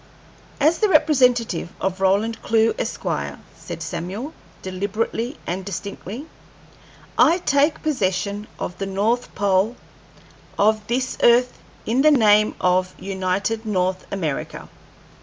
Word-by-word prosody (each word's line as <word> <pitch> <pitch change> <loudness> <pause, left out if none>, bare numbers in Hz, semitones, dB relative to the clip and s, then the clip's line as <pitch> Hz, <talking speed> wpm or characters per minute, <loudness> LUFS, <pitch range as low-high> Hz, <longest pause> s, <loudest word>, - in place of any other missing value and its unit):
"As 310 +3 +3
the 425 - +3
representative 250 - +3
of 190 0 -2
Roland 205 +4 +1
Clewe, 225 0 +2
Esq.," - - -4 0.5
said - - -7
Samuel, 190 - -5 0.3
deliberately 210 +6 -3
and 185 +2 -3
distinctly, 200 - -6 0.9
"I 340 - +6
take 295 -2 +1
possession 205 - -1
of 180 - -5
the 195 - -2
north 215 +6 -1
pole 200 +3 +2 0.8
of 215 0 +2
this 255 +2 -1
earth 245 +1 +4 0.3
in 245 +4 +2
the 305 - +6
name 215 -6 +4
of 185 0 +1
United 195 +3 -2
North 185 -3 -1
America." 165 -8 -4
210 Hz, 115 wpm, -22 LUFS, 190-245 Hz, 0.9 s, I